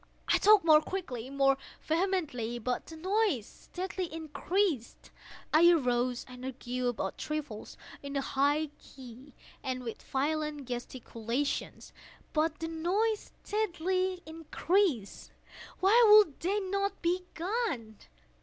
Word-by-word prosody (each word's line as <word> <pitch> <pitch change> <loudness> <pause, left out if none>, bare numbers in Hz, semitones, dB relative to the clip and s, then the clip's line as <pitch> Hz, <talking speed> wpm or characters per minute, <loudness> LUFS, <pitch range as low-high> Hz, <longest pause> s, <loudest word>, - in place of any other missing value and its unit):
I - - +4
talked 420 -4 +6
more 310 -2 +7
quickly—more 275 -6 0 0.2
vehemently; 315 - -1
but 245 +2 -3
the 325 - -9
noise 375 - +1
steadily 365 - -6
increased. 320 - -2 0.4
I 335 +3 +7
arose 250 -6 +1
and 250 -1 -11
argued 250 -1 -3
about 215 -5 -3
trifles, 295 -8 -5 0.2
in 280 0 -6
a 275 - +1
high 285 +3 +1
key 255 +1 -13 0.3
and 255 -1 -3
with 230 -2 -6
violent 295 0 -2
gesticulations; 245 +1 -4 0.4
but 310 0 +1
the 325 - -4
noise 380 +7 0
steadily 370 -3 -1
increased. 320 - -1 0.5
Why 430 +6 +6
would 420 -9 +7
they 390 +5 0
not 395 +1 -1
be 360 +2 +1
gone? 335 - -2
310 Hz, 115 wpm, -31 LUFS, 255-370 Hz, 0.5 s, more